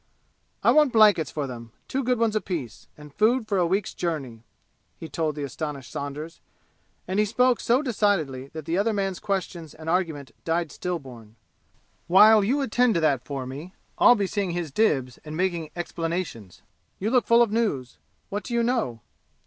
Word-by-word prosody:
"I - - +6
want 300 -3 +5
blankets 205 - +5
for 145 +3 -3
them 115 -3 -9
two 270 +1 -2
good 250 0 +1
ones 225 -1 +1
apiece 160 - -4
and 150 -1 -13
food 220 - +2
for 200 -3 +1
a 175 - +2
week's 190 +3 -1
journey!" 135 -10 -4 0.6
he 160 - -8
told 155 0 -2
the 145 - -4
astonished 140 -2 -5
Saunders; 150 +3 -6 0.7
and 190 +3 -1
he 210 - +4
spoke 250 +3 +2
so 250 +5 +2
decidedly 195 - 0
that 160 -2 -7
the 170 +3 0
other 220 +2 +1
man's 195 -3 -2
questions 175 -5 -4
and 160 0 -11
argument 160 -7 -1
died 165 -1 -1
stillborn. 130 -11 -6 0.7
"While 210 +4 +7
you 265 +8 +1
attend 250 -3 +2
to - - +3
that 140 -5 +2
for 135 -2 -5
me, 145 +8 -8 0.2
I'll 245 - +7
be 205 -3 0
seeing 195 0 -2
his 170 -4 -3
dibs 135 - +1
and 155 0 -8
making 170 -4 -1
explanations. 165 - -4 0.3
You 210 +4 -2
look 250 -2 +3
full 235 +1 +6
of 225 - -2
news. 205 - -1 0.3
What 205 +1 -3
do 235 - -4
you 235 - +2
know?" 230 - -1
175 Hz, 180 wpm, -25 LUFS, 145-215 Hz, 0.7 s, While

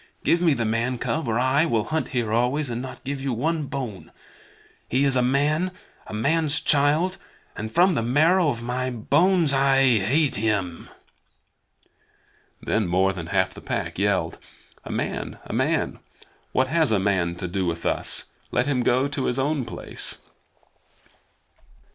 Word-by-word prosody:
Give 170 - +2
me 165 -5 +3
the 120 -2 -1
man 115 +3 0
cub, 155 +4 -2
or 115 0 0
I 130 +4 +3
will 115 -7 +1
hunt 155 +6 -2
here 115 -4 -2
always, 125 +4 +1
and 120 +1 -3
not 130 0 -8
give 140 0 -4
you 135 -2 -1
one 155 +5 -1
bone. 125 -9 -6 0.8
He 130 +3 +2
is 135 -2 +3
a 125 - +3
man, 145 +7 +1 0.4
a - - -8
man's 150 +6 +1
child, 155 +5 +2 0.4
and 110 +1 -5
from 180 +8 +4
the 140 - 0
marrow 155 +8 +3
of 115 -4 -3
my 125 +2 -2
bones 150 - +2
I 135 -3 +4
hate 135 +9 +1
him!" 100 -6 -2 1.7
Then 110 -3 0
more 95 +2 +2
than 85 -3 -6
half 95 0 +1
the - - -11
Pack - - -3
yelled: 100 -5 0 0.4
"A - - -7
man! - - -3
A - - -7
man! - - 0 0.5
What 130 - +2
has 155 -3 +2
a 110 - +3
man 95 -3 0
to 90 +1 -4
do 95 +1 -2
with 85 0 -3
us? - - -1 0.3
Let 125 - +1
him 140 -3 0
go 125 +3 +2
to 140 -2 -3
his 125 - -1
own 140 -1 0
place." 115 - -3
130 Hz, 165 wpm, -24 LUFS, 110-145 Hz, 1.7 s, from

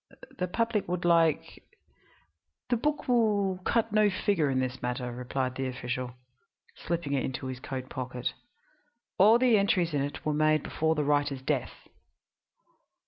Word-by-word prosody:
The 180 - 0
public 230 +2 -1
would 175 0 -2
like 165 -3 +2 0.5
" 80 +1 -41
"The - - +5
book 295 +5 -1
will 205 -6 +2
cut 225 +1 +1
no 215 -1 +5
figure 185 -5 +1
in 130 -1 +1
this 130 0 -3
matter," 125 0 -3
replied 125 +1 -3
the 130 0 -3
official, 125 0 -4 0.6
slipping 170 -4 -3
it 135 - +1
into 130 0 -4
his 130 -1 -5
coat 130 -1 -5
pocket; 125 -1 -4 0.9
"all 215 +5 +7
the 240 -4 +4
entries 180 -4 +1
in 145 - +1
it 145 +1 -5
were 155 - +1
made 155 0 +2
before 160 0 0
the 150 - 0
writer's 145 -2 0
death." 135 -2 -3
150 Hz, 155 wpm, -29 LUFS, 130-195 Hz, 0.9 s, all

